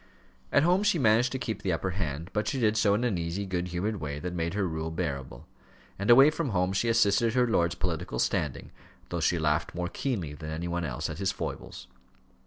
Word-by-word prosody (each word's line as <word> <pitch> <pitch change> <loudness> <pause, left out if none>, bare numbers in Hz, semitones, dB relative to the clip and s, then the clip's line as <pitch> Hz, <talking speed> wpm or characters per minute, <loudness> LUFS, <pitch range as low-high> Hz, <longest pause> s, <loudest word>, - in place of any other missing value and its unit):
At 140 - +4
home 180 +3 +3
she 205 -4 +2
managed 120 -2 +3
to 130 - -2
keep 115 -3 -4
the 95 - -1
upper 90 +3 -1
hand, 85 -2 -4
but 105 0 -1
she 135 - -1
did 110 -3 +2
so 105 -2 +3
in 110 - -1
an 110 -8 0
easy, 85 +4 -3
good 90 -1 -2
humoured 95 +5 -2
way 75 -4 -4
that 90 +4 -5
made 85 +1 -2
her 100 -3 +1
rule 80 -1 -3
bearable; 70 -4 -4 0.5
and 100 - -2
away 135 +5 +8
from 155 -2 -2
home 90 -2 +1
she 115 +4 +1
assisted 115 +1 +3
her 125 -1 +4
lord's 85 -7 +1
political 85 -6 -3
standing, - - -1 0.4
though 85 - -2
she 85 - +2
laughed 75 +1 0
more 90 0 -2
keenly 100 - -3
than 75 +1 -8
any 80 +2 -4
one 85 0 -2
else 60 -5 -3
at - - -6
his - - +1
foibles. - - -6
90 Hz, 220 wpm, -28 LUFS, 80-115 Hz, 0.5 s, away